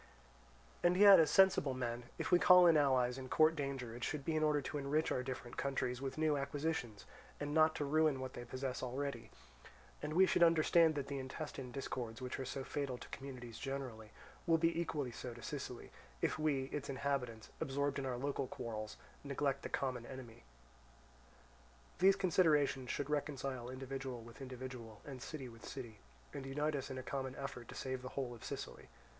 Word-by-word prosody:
"And 175 +1 +4
yet 200 -1 +10
as 160 - +5
sensible 190 -8 +5
men, 120 -1 -3
if - - -3
we 180 - +7
call 180 -2 +8
in 165 -2 +7
allies 130 -3 +3
and 130 -1 -7
court 155 +1 +5
danger, 135 -5 -3
it 120 - -7
should 145 -3 -2
be 160 - 0
in 155 - +2
order 150 -1 +3
to 145 +2 -4
enrich 145 +3 +1
our - - +1
different 125 -2 -6
countries 130 -2 -1
with 135 0 -4
new 155 -1 +3
acquisitions, 140 - -2 0.3
and 145 0 -3
not 155 0 +5
to 145 - -1
ruin 155 -1 +3
what 130 0 -5
they 120 - -6
possess 130 +1 -4
already; 140 +3 -3 0.7
and 150 +1 -3
we 185 +3 +7
should 185 - +1
understand 165 -1 +5
that 140 -2 -2
the 140 -1 -4
intestine 130 -1 -6
discords 120 -3 -4
which 125 0 -4
are 135 - -3
so 135 +1 -4
fatal 135 -2 -3
to - - -10
communities 125 -4 -8
generally, 130 -6 -5 0.4
will 165 -1 +5
be 165 +1 +2
equally 150 -6 -2
so 120 +1 -7
to 120 - -11
Sicily, 130 -4 -6 0.3
if - - 0
we, 150 -4 +1
its 140 -1 -3
inhabitants, 130 -5 -2
absorbed 140 +1 0
in 135 - -3
our 125 -2 -2
local 140 0 -2
quarrels, 110 -3 -5 0.3
neglect 140 -1 -1
the - - -5
common 125 -3 -2
enemy. 130 -4 -9 1.6
These 190 +2 +7
considerations 155 -9 +3
should 145 +1 -2
reconcile 135 -4 -2
individual 130 -1 -5
with 115 +3 -12
individual, 125 -4 -7
and 135 -3 -7
city 140 -2 -6
with 115 -1 -13
city, 120 -6 -7 0.3
and 135 - -5
unite 145 +3 -1
us 140 - -3
in 130 - -5
a 130 - -5
common 130 +1 -3
effort 125 -4 -6
to - - -9
save 130 -1 -3
the 130 - -6
whole 130 -3 -1
of 115 - -12
Sicily. - - -6
135 Hz, 190 wpm, -37 LUFS, 125-150 Hz, 1.6 s, yet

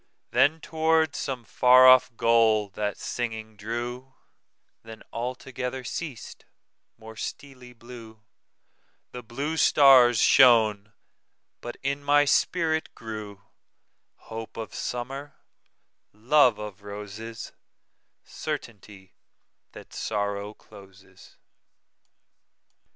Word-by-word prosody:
Then 155 +4 +3
toward 160 -1 0
some 130 -3 -4
far 125 +2 +5
off 130 0 +6
goal 115 -3 +3
that 105 +1 -4
singing 110 -2 -5
drew; 120 +5 -6 0.7
Then 110 -1 -12
altogether 125 +1 -5
ceas'd; 135 -2 -7 0.5
more 110 0 -12
steely 125 0 -9
blueThe 115 -1 -13 1.1
blue 140 +8 -4
stars 130 -6 +6
shone; 110 -5 +4 0.7
but 120 - -8
in 140 +1 -2
my 145 +1 +4
spirit 160 +1 0
grewHope 110 +1 -12
of 115 - -7
Summer, 135 +4 -6 0.8
love 125 +2 +3
of 105 -2 -9
Roses, 105 +3 -9 0.7
Certainty 105 - -8 0.6
that - - -13
Sorrow 100 0 -4
closes. 95 -2 -18
120 Hz, 85 wpm, -25 LUFS, 105-130 Hz, 1.1 s, off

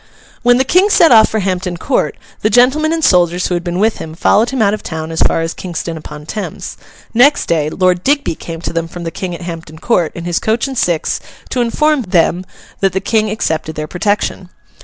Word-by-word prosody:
When 245 0 +4
the 260 - +3
King 365 +9 +3
set 335 -5 +5
off 220 -2 +7
for 220 - -1
Hampton 185 -2 -2
Court, 260 +8 -1 0.2
the 215 - +2
gentlemen 260 +8 +3
and 325 -1 -1
soldiers 180 0 +3
who - - -1
had 175 0 -1
been 175 0 -3
with 215 +3 +1
him 160 0 -7
followed 215 +6 +3
him 270 - -3
out 205 -2 +3
of 215 - -3
town 160 0 -5
as 160 - -2
far - - +2
as 165 0 -3
Kingston 170 -2 -5
upon 150 -1 -9
Thames; 210 +6 -6 0.4
next 255 +5 +4
day, 155 -3 0
Lord 180 +1 +1
Digby 280 - +1
came 165 0 -8
to - - -4
them 165 0 -2
from 175 +1 -8
the 165 - -4
King 180 -1 -5
at 170 - -10
Hampton 165 -2 -7
Court, 175 -3 +1
in 170 - -6
his 175 -1 0
coach 220 +2 0
and 270 - -6
six, 175 -9 0 0.3
to 250 - 0
inform 300 +5 +1
them 180 -2 +1 0.3
that 195 -1 +1
the 190 - 0
King 215 +2 0
accepted 160 -7 -2
their 155 - -3
protection. 190 +1 -2
185 Hz, 225 wpm, -15 LUFS, 165-230 Hz, 0.4 s, off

